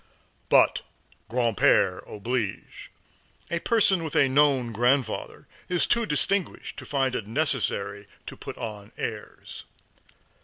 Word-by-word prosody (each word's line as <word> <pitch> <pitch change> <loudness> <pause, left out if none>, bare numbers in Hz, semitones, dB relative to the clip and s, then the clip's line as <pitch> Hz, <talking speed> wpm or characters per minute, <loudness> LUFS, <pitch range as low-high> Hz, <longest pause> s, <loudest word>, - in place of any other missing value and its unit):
But - - +4 0.5
grand 115 -1 0
père 90 -1 +3
oblige; 105 0 -4 0.6
a 170 - 0
person 195 -4 +3
with 160 - -2
a 140 - +5
known 135 -3 +3
grandfather 120 +1 0 0.2
is 180 -1 +2
too 235 -2 +1
distinguished 185 +5 0
to - - -8
find 135 -3 0
it 105 - -4
necessary 110 -6 -1 0.2
to - - -8
put - - -9
on 105 -2 -7
airs. - - -7
130 Hz, 120 wpm, -26 LUFS, 110-150 Hz, 0.6 s, a